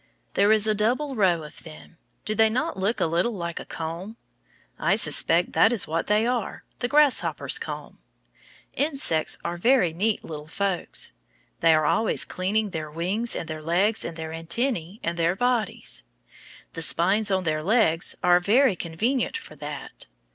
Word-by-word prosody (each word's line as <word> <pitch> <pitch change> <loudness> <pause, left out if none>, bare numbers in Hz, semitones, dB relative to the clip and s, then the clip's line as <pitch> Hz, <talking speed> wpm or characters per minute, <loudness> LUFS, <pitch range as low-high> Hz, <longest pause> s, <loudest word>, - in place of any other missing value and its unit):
There 205 +1 +3
is 215 -1 +4
a 215 - +3
double 245 +7 0
row 180 -7 +2
of 150 - -10
them. 160 +1 -13 0.3
Do 215 - -1
they 220 +1 +4
not 280 +9 -2
look 195 +5 -1
a - - +2
little 170 +8 0
like 170 -2 -5
a - - -8
comb? 170 +7 -6 0.6
I - - +2
suspect - - +2
that - - +4
is 235 -5 +2
what 165 +1 -2
they 210 +2 +2
are, 245 -3 -2 0.2
the 245 - -1
grasshopper's 295 0 +3
comb. - - -7 0.7
Insects 275 - +1
are 170 +1 -3
very 230 -4 +3
neat 205 +5 -1
little 150 -2 -8
folks. 195 +1 0 0.5
They 165 -1 +5
are 155 -1 +1
always 220 +9 +1
cleaning 205 +3 -1
their 155 -2 -5
wings 185 +9 -1
and 165 - -4
their 155 -1 -6
legs 185 +7 +1
and 165 - -6
their 160 0 -6
antennæ 170 +3 -2
and 170 0 -3
their 170 +2 +1
bodies. 235 - -1 0.7
The 165 - -5
spines 195 +6 +3
on 190 -1 0
their 155 -2 -1
legs 175 -3 +2
are 175 0 +5
very 215 +4 +3
convenient 220 +11 -2
for 155 - -12
that. 145 - -8
190 Hz, 170 wpm, -25 LUFS, 165-225 Hz, 0.7 s, They